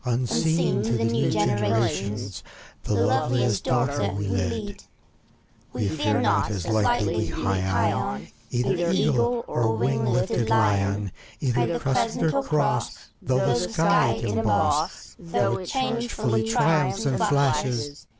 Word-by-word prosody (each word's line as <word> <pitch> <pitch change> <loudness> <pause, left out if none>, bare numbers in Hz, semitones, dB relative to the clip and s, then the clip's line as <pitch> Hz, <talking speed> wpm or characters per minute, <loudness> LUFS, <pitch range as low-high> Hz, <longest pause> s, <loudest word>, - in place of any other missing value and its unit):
Unseen 130 +7 +1
to 110 +2 -1
the 115 -1 0
new 115 0 +1
generations, 105 -1 -1 0.4
The 105 - 0
loveliest 120 +2 +1
daughter 125 -4 0
we 100 +1 -3
lead. 95 -2 -3 0.9
We 115 -5 -1
fear 110 -9 0
not, 100 -1 +1
as 95 -5 -4
lightly 110 -1 +1
we 110 - 0
hie 95 -1 0
on, - - -3 0.2
Either 130 +8 0
Eagle 120 -8 +1
or 110 -2 0
wing 120 0 0
lifted 120 -2 0
Lion, 100 -2 +1 0.3
Either 125 +4 0
Crescent 155 - 0
or 140 - +1
Cross, 135 -5 0 0.3
"'hough 130 0 +2
the - - +3
sky 165 - +2
it 115 +1 -4
emboss, 110 +7 0
— 165 - -13
ough - - +1
it 185 - -7
changefully 235 - -1
triumphs 150 +2 +1
and 135 -2 0
flashes. 140 -1 0
120 Hz, 130 wpm, -24 LUFS, 105-140 Hz, 0.9 s, the